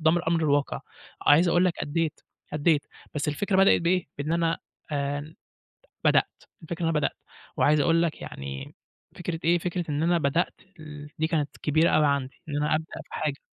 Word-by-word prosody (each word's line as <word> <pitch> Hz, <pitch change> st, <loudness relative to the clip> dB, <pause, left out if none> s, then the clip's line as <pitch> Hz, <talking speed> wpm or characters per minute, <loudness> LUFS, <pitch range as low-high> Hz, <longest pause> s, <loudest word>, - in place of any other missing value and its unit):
قُدّام 160 Hz, +2 st, +4 dB
الأمر 170 Hz, -1 st, +1 dB
الواقع. 145 Hz, -2 st, +1 dB, 0.5 s
عايز 165 Hz, +5 st, +6 dB
أقول 175 Hz, +2 st, +4 dB
لك 180 Hz, -, +3 dB
أدّيت، 160 Hz, +1 st, -1 dB, 0.3 s
أدّيت. 150 Hz, 0 st, +2 dB, 0.3 s
بس 150 Hz, 0 st, -1 dB
الفكرة 190 Hz, +6 st, 0 dB
بدأِت 195 Hz, -2 st, +6 dB
بإيه، 180 Hz, +1 st, +2 dB
بإن 150 Hz, +3 st, -2 dB
أنا 165 Hz, -1 st, +1 dB, 0.3 s
آآ 145 Hz, +2 st, -2 dB, 0.7 s
بدأت، -, -, +2 dB, 0.2 s
الفكرة 170 Hz, +2 st, -5 dB
أنا 165 Hz, -, +2 dB
بدأت. 150 Hz, -2 st, 0 dB, 0.4 s
وعايز 150 Hz, 0 st, +4 dB
أقول 165 Hz, +3 st, +3 dB
لك 165 Hz, -, -2 dB
يعني 70 Hz, 0 st, -7 dB, 0.4 s
فكرة 175 Hz, -2 st, -4 dB
إيه، 170 Hz, +2 st, +4 dB
فكرة 175 Hz, +1 st, -2 dB
إن 150 Hz, +2 st, 0 dB
أنا 170 Hz, 0 st, +3 dB
بدأت 165 Hz, +3 st, +1 dB, 0.3 s
ال 150 Hz, -1 st, -9 dB
دي 160 Hz, -, +2 dB
كانت 155 Hz, -4 st, 0 dB
كبيرة 155 Hz, +3 st, +3 dB
أوي 155 Hz, -1 st, +4 dB
عندي، 140 Hz, -2 st, -1 dB
إن 145 Hz, -, -3 dB
أنا 150 Hz, +1 st, +2 dB
أبدأ 160 Hz, +1 st, -2 dB, 0.2 s
في -, -, -16 dB
حاجة. 145 Hz, -2 st, -2 dB
155 Hz, 175 wpm, -27 LUFS, 145-170 Hz, 0.7 s, عايز